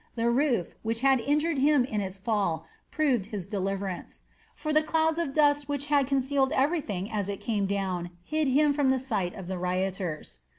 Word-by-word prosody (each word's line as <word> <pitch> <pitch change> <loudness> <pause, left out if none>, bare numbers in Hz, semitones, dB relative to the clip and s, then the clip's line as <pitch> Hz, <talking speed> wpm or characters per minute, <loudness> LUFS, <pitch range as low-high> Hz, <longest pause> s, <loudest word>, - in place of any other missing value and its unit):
The 235 0 +1
roof, 245 - +1
which 225 +1 -2
had 270 -1 +4
injured 295 +4 +1
him 285 -2 +4
in 215 -5 -2
its 190 -1 -5
fall, 195 -6 -1 0.2
proved 260 -10 +1
his 205 -5 -5
deliverance; 195 -2 -4 0.3
for 305 -1 -3
the 310 - +5
clouds 320 +1 +1
of 335 -5 -1
dust 290 -1 +3
which 285 -1 -1
had 280 -2 +4
concealed 270 0 +1
everything 260 - 0
as 205 -2 -2
it 200 - -4
came 205 -4 -1
down 190 -3 -2
hid 310 +4 0
him 290 +2 +4
from 280 -2 +2
the 265 - +3
sight 215 -9 -2
of 190 - -7
the 185 0 -4
rioters. 180 - -2
235 Hz, 185 wpm, -28 LUFS, 195-285 Hz, 0.3 s, the